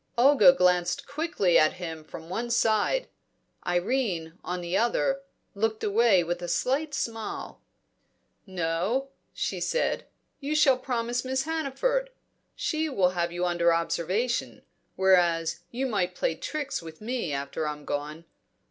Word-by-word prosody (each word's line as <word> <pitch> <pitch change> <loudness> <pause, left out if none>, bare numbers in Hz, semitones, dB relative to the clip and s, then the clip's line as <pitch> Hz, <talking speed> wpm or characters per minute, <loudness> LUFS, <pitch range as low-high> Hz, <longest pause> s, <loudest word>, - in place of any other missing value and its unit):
Olga 270 +2 +7
glanced 180 -6 +2
quickly 280 - +2
at 155 - +4
him 165 -3 -6
from 160 +1 -10
one 230 +7 -3
side; 235 - +2 0.6
Irene, 175 -3 -1
on 180 0 -3
the 175 +1 -3
other, 270 +5 +1 0.3
looked 220 +2 -1
away 210 -3 +4
with 175 +1 -3
a 175 - -4
slight 275 - 0
smile. 225 -4 -4 0.9
"No," 185 +9 -1 0.2
she - - -3
said, - - -1 0.3
"you 290 +2 -2
shall 275 -4 +5
promise 245 -1 -2
Miss 260 0 -1
Hannaford. 325 - -1 0.5
She 315 -1 -1
will 190 -10 +3
have 170 -1 -1
you 175 +1 -1
under 175 -1 +3
observation; 170 +8 -1 0.3
whereas 175 -3 +3
you 255 +3 -2
might 195 -7 -1
play - - 0
tricks 300 -3 -4
with 160 -1 -10
me 230 -6 -3
after 140 +2 -3
I'm 150 -1 -5
gone. 150 +3 -4
200 Hz, 135 wpm, -27 LUFS, 170-265 Hz, 0.9 s, Olga